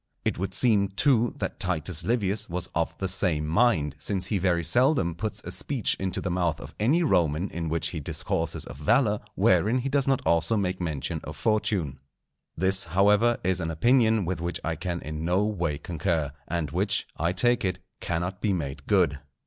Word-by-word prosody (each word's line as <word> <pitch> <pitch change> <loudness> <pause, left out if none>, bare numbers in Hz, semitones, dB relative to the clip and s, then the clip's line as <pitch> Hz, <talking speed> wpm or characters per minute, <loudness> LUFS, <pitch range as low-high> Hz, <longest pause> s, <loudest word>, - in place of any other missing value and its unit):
It - - -1
would 95 0 -2
seem, 105 -3 +4
too, 120 +5 +2
that - - -4
Titus 90 -4 0
Livius 105 -1 0
was 90 +1 -4
of 85 0 -1
the 95 - -2
same 90 -5 +1
mind, 80 - +2
since 95 +2 -2
he 105 - -1
very 85 -2 +1
seldom 125 - +2
puts 105 +4 -5
a - - -6
speech 135 -8 -1
into 95 -1 -1
the 90 - -3
mouth 85 -3 0
of - - -10
any 145 +12 +3
Roman 85 - +1
in 80 -1 -4
which 80 +1 -1
he 85 - -5
discourses 75 - -2
of - - -10
valour, 105 - +2 0.2
wherein 110 +5 +3
he 130 +2 -2
does 140 -1 +1
not 135 -1 +2
also 85 +6 +2
make 95 -2 -2
mention 80 -6 -3
of - - -8
Fortune. 100 - 0 0.6
This, 95 +3 +2
however, 105 +5 +3
is 95 0 0
an 80 - -2
opinion 110 +4 +3
with 90 0 -3
which 85 +1 -2
I 80 0 -2
can 85 +1 -4
in 75 +1 -6
no 90 +4 +2
way 85 -8 -1
concur, 80 -1 -2 0.2
and 85 -4 -2
which, 100 +5 0
I 85 +2 0
take 120 +5 +2
it, 95 -1 -1 0.2
cannot 90 +4 -3
be 105 -3 +1
made 70 -5 -5
good. 85 -8 +2
95 Hz, 190 wpm, -26 LUFS, 85-105 Hz, 0.6 s, seem